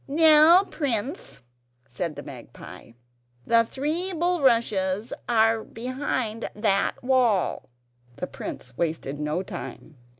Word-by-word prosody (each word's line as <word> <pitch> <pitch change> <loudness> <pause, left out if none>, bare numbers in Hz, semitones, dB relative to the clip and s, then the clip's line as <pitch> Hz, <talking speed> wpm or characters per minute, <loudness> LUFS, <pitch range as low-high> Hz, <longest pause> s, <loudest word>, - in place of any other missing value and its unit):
"Now, 315 +4 +6
prince," 275 - -3 0.5
said 155 +6 -4
the 145 - -8
magpie, 115 - -12 0.5
"the 230 0 +4
three 310 +10 -2
bulrushes 235 - +1 0.2
are 225 -1 +3
behind 245 -2 -4
that 205 -2 +1
wall." 245 - +1 0.5
The - - -4
prince - - -8
wasted 155 -4 -2
no 150 +5 -2
time. 155 -4 -9
230 Hz, 100 wpm, -25 LUFS, 190-285 Hz, 0.5 s, Now